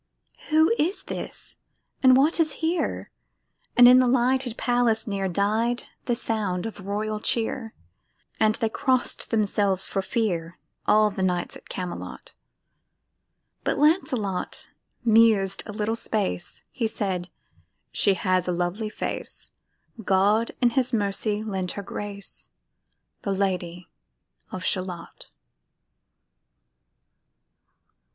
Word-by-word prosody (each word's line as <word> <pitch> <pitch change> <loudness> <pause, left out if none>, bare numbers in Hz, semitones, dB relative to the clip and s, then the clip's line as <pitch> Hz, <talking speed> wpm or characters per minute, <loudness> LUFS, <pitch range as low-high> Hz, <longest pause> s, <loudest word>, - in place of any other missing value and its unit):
Who 315 +6 +4
is 380 +5 0
this? - - -5 0.4
and 260 -1 +7
what 300 +6 +3
is 310 -3 +2
here? 340 +2 -1 0.7
And 245 0 +10
in 250 +1 +8
the 255 - +4
lighted 250 0 +1
palace 240 -2 +2
near 195 -2 -2
Died 215 +6 0 0.2
the 240 - +1
sound 215 -6 -2
of 205 -3 -7
royal 210 +1 -2
cheer; 225 +1 -1 0.6
And 215 0 +3
they 225 -2 0
cross'd 255 +3 0
themselves 200 -3 +1
for 195 - -2
fear, 180 -6 -2 0.3
All 215 0 +5
the 195 - -5
knights 180 -2 -1
at - - -14
Camelot: 180 -1 -6 1.3
But - - 0
Lancelot 260 - 0 0.4
mused 220 -4 +4
a - - -5
little 210 +1 -1
space; 210 - -2
He 235 -4 -1
said, 185 -5 -1 0.6
"She 200 -2 +3
has 185 -1 +1
a - - +1
lovely 180 +5 -2
face; - - -6 0.5
God 200 +4 +3
in 240 -1 +4
His 255 0 +1
mercy 210 -1 -1
lend 190 -4 -3
her 200 - -6
grace, 200 0 -7 0.7
The 200 - -1
Lady 180 -3 -2 0.6
of 185 0 -5
Shalott." 180 -3 -4
215 Hz, 115 wpm, -25 LUFS, 190-240 Hz, 1.3 s, And